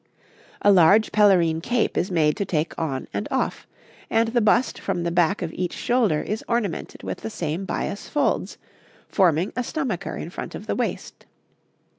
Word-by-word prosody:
A 205 - +6
large 195 +4 +5
pelerine 180 -6 +4
cape 240 +5 0
is 180 - 0
made 155 -4 +2
to 205 - 0
take 165 -4 -1
on 140 -6 -3
and 100 +1 -2
off; - - -2 0.4
and 225 0 +2
the 240 +1 +1
bust 225 +4 +2
from 175 - -2
the 170 - -1
back 175 +3 +2
of 165 - -4
each 180 -1 -3
shoulder 225 -11 +1
is 215 +2 -3
ornamented 235 -7 -2
with - - -4
the - - -5
same 170 -2 -3
bias 200 +1 -4
folds, 290 -2 0 0.5
forming 180 -2 +2
a 250 - -1
stomacher 275 +1 -3
in - - -6
front - - -6
of - - -8
the - - -2
waist. - - -4
190 Hz, 175 wpm, -24 LUFS, 165-225 Hz, 0.5 s, A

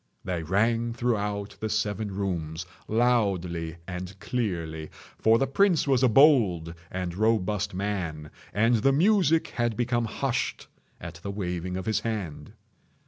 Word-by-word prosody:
They 90 -2 -2
rang 115 +7 +1
throughout 105 -4 -2
the 110 - -2
seven 105 0 -1
rooms 85 -4 -3 0.2
loudly 95 -8 +1
and 90 +1 -6
clearly—for 95 -1 -1
the 135 - +2
prince 170 +3 +2
was 135 -3 +3
a 130 - +5
bold 110 - +4 0.2
and 90 -2 -3
robust 105 -1 0
man, 90 -7 -3 0.2
and 115 +3 +3
the 135 +5 +3
music 170 0 +3
had 120 -2 -1
become 120 -1 +1
hushed 130 +3 -2 0.3
at 85 0 -8
the 100 - -5
waving 90 -2 -3
of 95 - -5
his 110 - +1
hand. 100 -8 -4
105 Hz, 135 wpm, -27 LUFS, 90-120 Hz, 0.3 s, a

